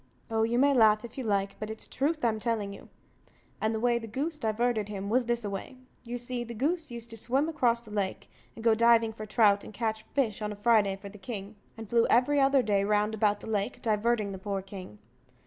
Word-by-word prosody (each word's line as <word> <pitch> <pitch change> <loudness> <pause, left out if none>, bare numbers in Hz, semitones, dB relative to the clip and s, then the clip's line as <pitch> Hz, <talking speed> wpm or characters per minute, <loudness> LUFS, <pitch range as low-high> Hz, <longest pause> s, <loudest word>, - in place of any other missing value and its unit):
Oh, 225 0 +1
you 230 +2 +1
may 280 +2 +5
laugh, 220 -3 +5
if 235 - -11
you 265 - -4
like, 200 -3 -1
but 215 - -5
it's 220 0 -6
truth 300 0 -1
I'm 220 -2 +1
telling 215 -3 -2
you; - - -13 0.7
and 220 - +1
the 220 - -2
way 240 0 +2
the 225 - -8
goose 300 +8 -3
diverted 220 -2 0
him 200 0 -4
was 250 +1 +3
this 235 -1 -1
a - - -2
way: 200 +6 -6 0.3
You 245 0 -4
see, 245 0 -3
the 235 0 -8
goose 315 +7 -1
used 235 -1 -7
to 225 - -7
swim 265 +7 +1
across 240 -7 +1
the 220 -3 -14
lake, 200 -2 -2 0.3
and 225 - -9
go 230 -1 +5
diving 230 0 +4
for 215 0 -8
trout 205 -2 +4
and - - -10
catch 220 0 -2
fish 230 -7 0
on 210 0 -2
a - - -5
Friday 205 -2 +3
for 200 +1 -10
the 210 +1 -13
king, 205 0 -7 0.2
and 225 -1 -8
flew 230 +2 +3
every 270 +4 +4
other 270 -1 +4
day 200 -3 +2
round 210 +1 +1
about 210 -1 +1
the - - -9
lake, 215 +2 -2
diverting 215 -1 +1
the 190 - -7
poor 195 0 -3
king. 190 - -10
220 Hz, 235 wpm, -29 LUFS, 210-240 Hz, 0.7 s, may